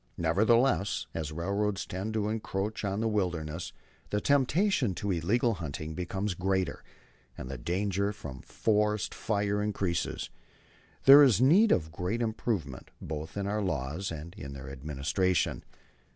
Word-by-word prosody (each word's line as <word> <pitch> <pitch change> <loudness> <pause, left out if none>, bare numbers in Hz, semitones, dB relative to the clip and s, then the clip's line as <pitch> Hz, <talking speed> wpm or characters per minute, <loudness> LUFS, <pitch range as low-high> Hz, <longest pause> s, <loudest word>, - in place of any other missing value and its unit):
Nevertheless, 105 +5 +2
as 80 -2 -3
railroads 100 +5 -1
tend 100 +4 -4
to 105 -1 0
encroach 105 -1 -3
on 100 +1 -1
the 115 - +1
wilderness, 85 -6 -2 0.4
the 105 - 0
temptation 145 - +2
to 100 +2 -2
illegal 110 +8 +1
hunting 80 -3 -5
becomes 95 +3 -2
greater, 95 0 -1 0.5
and 65 - -6
the 70 - -5
danger 100 +6 0
from 70 -10 -8
forest 105 -1 0
fires 105 -1 0
increases. 95 -5 -2 0.7
There 140 +2 +10
is 125 -8 +6
need 180 - +6
of 80 -2 +1
great 90 +8 -2
improvement 105 - -3
both 80 +3 -6
in 100 - -1
our 105 +1 -1
laws 80 0 -2
and 80 +2 -7
in 70 -9 -8
their 70 0 -8
administration. 75 +6 -1
95 Hz, 135 wpm, -30 LUFS, 80-105 Hz, 0.7 s, There